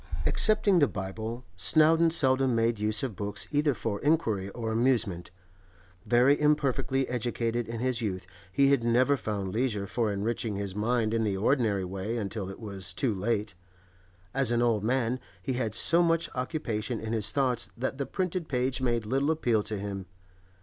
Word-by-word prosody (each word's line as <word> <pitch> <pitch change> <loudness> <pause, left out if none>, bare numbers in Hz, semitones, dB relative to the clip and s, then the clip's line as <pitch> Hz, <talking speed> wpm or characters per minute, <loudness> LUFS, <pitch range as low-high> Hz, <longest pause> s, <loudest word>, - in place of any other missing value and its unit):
Excepting 215 -4 +4
the 145 - +5
Bible, 110 +5 -5
Snowdon 160 - +4
seldom 130 -5 +3
made 115 -1 +1
use 105 +2 +1
of 125 -6 -3
books 105 +1 -2
either 145 -2 +2
for 105 -3 -3
inquiry 115 - +1
or 110 +1 -4
amusement. 110 -7 0 0.8
Very 125 +6 +4
imperfectly 135 -3 +1
educated 120 -1 -2
in 115 0 -5
his 125 -2 0
youth, 95 -4 -3 0.3
he 140 +7 +3
had 135 -4 +3
never 125 +4 +3
found 100 -6 -4
leisure 110 -4 -1
for 110 +2 -1
enriching 105 +1 -2
his 100 -1 -4
mind 110 +1 0
in 115 -1 +1
the 100 -3 -1
ordinary 105 -3 +1
way 95 +5 -4
until 100 -2 -4
it 95 - -9
was 100 -4 -6
too 125 -5 +1
late; 105 +1 -1 0.8
as 135 -3 +1
an 120 0 +2
old 115 -4 +1
man 125 +1 0 0.2
he 130 - -3
had 115 -4 -2
so 170 +7 +4
much 165 -1 +1
occupation 125 -4 -3
in 110 +1 -4
his 105 -3 +1
thoughts 130 -4 +1
that 130 +2 -3
the 140 - -2
printed 180 -3 -2
page 130 0 -1
made 120 -3 0
little 135 +6 0
appeal 125 -9 +1
to 105 0 -3
him. 100 -2 -5
115 Hz, 170 wpm, -28 LUFS, 105-135 Hz, 0.8 s, the